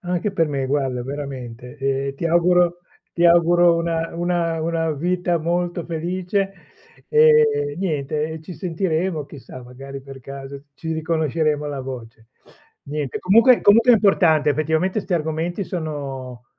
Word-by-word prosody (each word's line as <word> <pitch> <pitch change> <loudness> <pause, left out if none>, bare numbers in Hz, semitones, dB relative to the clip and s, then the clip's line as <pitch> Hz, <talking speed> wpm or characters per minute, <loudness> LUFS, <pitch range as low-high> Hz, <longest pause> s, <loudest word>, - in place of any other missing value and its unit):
Anche 180 +1 -2
per 165 -4 +1
me, 140 -3 -2
guarda, 135 -3 -1
veramente. 130 -3 -7
E 135 0 -2
ti 170 - -2
auguro 175 +1 +3 0.3
ti 170 - 0
auguro 170 0 +5
una 165 -1 -2
una 170 -1 -1
una 165 0 -1
vita 175 +3 0
molto 175 +1 -2
felice. 180 +4 -2 0.6
E 455 -1 +4
niente, 150 -4 -2
e 160 0 -7
ci 180 - -9
sentiremo, 165 -1 -2
chissà, 130 -3 -11
magari 135 +3 -9
per 135 0 -11
caso 140 +1 -9
ci 160 +3 -5
riconosceremo 160 -2 0
la 145 -2 -4
voce. 120 -4 -9 0.6
Niente, 145 -2 -4
comunque 230 +6 +5
comunque 230 +4 +6
è - - +8
importante, 175 -8 +3
effettivamente 160 +7 0
'sti 190 - -2
argomenti 165 +4 -2
sono 135 -8 -6
160 Hz, 135 wpm, -21 LUFS, 140-175 Hz, 0.6 s, è